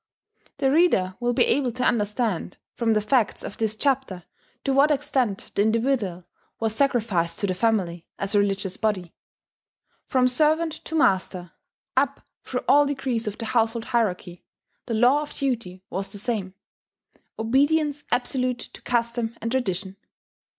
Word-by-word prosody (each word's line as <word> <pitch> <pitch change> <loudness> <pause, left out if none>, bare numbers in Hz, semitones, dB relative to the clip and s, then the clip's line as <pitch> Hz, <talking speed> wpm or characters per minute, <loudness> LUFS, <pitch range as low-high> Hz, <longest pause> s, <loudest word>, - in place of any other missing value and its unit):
The 270 -2 +2
reader 270 - +3
will 240 0 +1
be - - +4
able 260 -1 +1
to 250 - -2
understand, 210 -4 0 0.2
from 230 -2 +1
the 215 - +2
facts 225 0 +1
of - - -7
this 220 -1 0
chapter, 260 -8 -1 0.4
to 275 - +1
what 280 +3 +5
extent 270 -8 -1
the - - +2
individual 220 -5 +1 0.4
was 225 -1 0
sacrificed 220 -11 +1
to - - 0
the 185 - 0
family, 185 -4 0
as 200 +1 -3
a 205 - +5
religious 195 -2 -1
body. 195 -6 -1 0.9
From 255 -1 +3
servant 310 +5 +2
to 320 - -4
master 185 - +1 0.4
up - - +1 0.2
through - - -3
all 290 +1 +6
degrees 260 -5 -2
of 210 - -3
the 230 - -5
household 225 0 +1
hierarchy 190 -7 -1 0.4
the 230 - -1
law 250 +6 +4
of 300 - -7
duty 230 -10 -2
was 195 +2 -3
the - - -6
same: 200 -3 -3 0.8
obedience 290 +5 +2
absolute 250 0 +1
to - - -11
custom 235 -1 -1
and 230 - -3
tradition. 195 -6 -2
230 Hz, 150 wpm, -24 LUFS, 200-265 Hz, 0.9 s, all